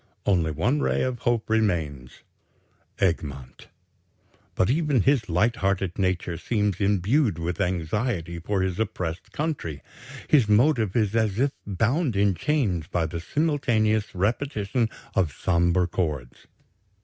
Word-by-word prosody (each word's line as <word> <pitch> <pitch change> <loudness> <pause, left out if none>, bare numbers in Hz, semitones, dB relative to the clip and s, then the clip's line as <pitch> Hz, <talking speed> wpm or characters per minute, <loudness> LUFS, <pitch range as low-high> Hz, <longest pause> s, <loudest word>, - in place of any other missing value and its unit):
Only 85 -5 +2
one 80 - 0
ray - - +1
of 130 -2 -2
hope 120 -2 0
remains 80 - -1 0.7
Egmont. 70 -8 -2 0.9
But 95 - +2
even 150 -4 +2
his 125 -3 +2
light 110 +8 +2
hearted 95 -3 -1
nature 90 -2 -1
seems 105 -2 -1
imbued 105 - +2
with 85 +1 -3
anxiety 90 0 -1
for 95 +3 -1
his 95 0 -2
oppressed 90 -6 -3
country. 130 - -3 0.4
His 130 -8 +4
motive 110 -2 +3
is 110 -2 +1
as 110 -3 +1
if 135 +3 +2 0.2
bound 115 - 0
in 100 0 +3
chains 95 - 0
by 85 -2 0
the 80 +1 -4
simultaneous 110 - 0
repetition 110 +2 0 0.2
of 90 -6 +1
sombre 85 +3 +1
chords. 75 -8 -4
100 Hz, 125 wpm, -25 LUFS, 85-120 Hz, 0.9 s, His